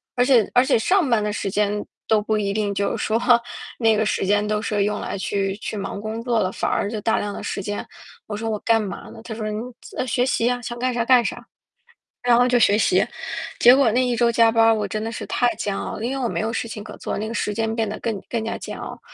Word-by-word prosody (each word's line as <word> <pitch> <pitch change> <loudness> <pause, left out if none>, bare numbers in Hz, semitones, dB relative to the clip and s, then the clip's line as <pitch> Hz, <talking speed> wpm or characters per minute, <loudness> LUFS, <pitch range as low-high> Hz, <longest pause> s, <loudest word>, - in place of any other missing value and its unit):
而 245 - +3
且 250 -5 +4
而 245 - +6
且 270 - +3
上 350 - +2
班 225 -3 +2
的 210 - -1
时 200 - -2
间 205 +1 0 0.2
都 215 -1 +3
不 215 +1 0
一 200 -1 -1
定 205 -1 -1
就 200 0 0
是 - - -3
说 220 +1 +1 0.6
那 225 -2 +4
个 220 - +1
时 205 - 0
间 205 +1 +2
都 210 0 -1
是 210 -2 0
用 210 +1 -1
来 - - -4
去 195 0 -1
去 215 - -5
忙 200 0 -4
工 220 +1 -4
作 235 -2 +1
了， 185 -1 0
反 - - -2
而 200 - 0
就 220 - -3
大 220 - +1
量 205 0 -3
的 - - -6
时 195 - -4
间， 205 +1 -4 0.4
我 210 - -4
说 225 +1 -3
我 215 -1 -2
干 225 +1 +2
嘛 195 -4 -6
呢？ 225 - -11
他 230 - -6
说： 215 -1 -4
“你 210 - -3 0.2
自 - - -12
啊， - - 0
学 250 0 +1
习 240 -2 +1
啊， 245 0 -1
想 240 0 -6
干 255 +1 0
啥 235 -1 0
干 250 -1 +5
啥。” - - -4 0.8
然 245 -1 +4
后 245 +1 +4
就 245 -1 +3
学 205 -2 +4
习， - - +3 0.6
结 245 +2 +8
果 265 -5 +4
那 255 +2 +3
一 245 -1 0
周 235 0 +3
加 230 -1 +4
班 225 0 +4
儿， 225 0 +5
我 210 -2 -2
真 215 +2 -3
的 225 - -3
是 230 - -6
太 245 -1 +1
煎 205 -2 -2
熬 - - -4
了， 220 - -4
因 245 - -1
为 270 - -3
我 235 - 0
没 - - -2
有 220 +1 -2
事 230 - -2
情 215 -2 -7
可 - - -9
做， - - -4
那 215 - -3
个 225 - -5
时 210 - -1
间 225 +1 -1
变 225 -2 0
得 215 - -5
更 220 -4 -3
更 230 -2 -2
加 225 - -2
煎 - - -7
熬。 - - -7
220 Hz, 305 characters per minute, -22 LUFS, 210-235 Hz, 0.8 s, 结